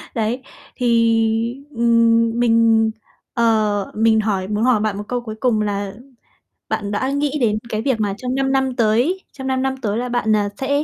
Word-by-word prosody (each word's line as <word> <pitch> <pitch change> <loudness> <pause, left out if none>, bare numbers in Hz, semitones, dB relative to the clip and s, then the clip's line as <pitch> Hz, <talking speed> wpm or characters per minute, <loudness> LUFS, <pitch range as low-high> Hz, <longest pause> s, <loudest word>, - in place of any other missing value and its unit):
Đấy, 230 +3 -1 0.3
thì, 230 +1 +1
ừm, 230 -1 +3
mình, 225 -1 +3 0.4
ờ, 215 -4 +1
mình 220 0 +3
hỏi 195 -3 -1
muốn 210 +2 -1
hỏi 250 -3 +3
bạn 210 -1 -1
một 205 - -4
câu 245 +1 -2
cuối 220 -2 -7
cùng 230 -3 +1
là 200 -1 -2 0.8
bạn 205 -2 -2
đã 260 +6 -1
nghĩ 290 +1 -1
đến 215 -3 +2
cái 215 -1 -2
việc 255 -3 0
mà 205 -2 0
trong 250 +3 -3
5 270 0 0
năm 265 -1 0
tới, 245 - +1
trong 265 -1 -7
5 260 0 0
năm 265 0 -1
tới 210 -2 -1
là 245 +1 -2
bạn, 230 -3 +1
à, 205 -1 0
sẽ 285 +2 0
230 Hz, 190 wpm, -20 LUFS, 215-255 Hz, 0.8 s, ừm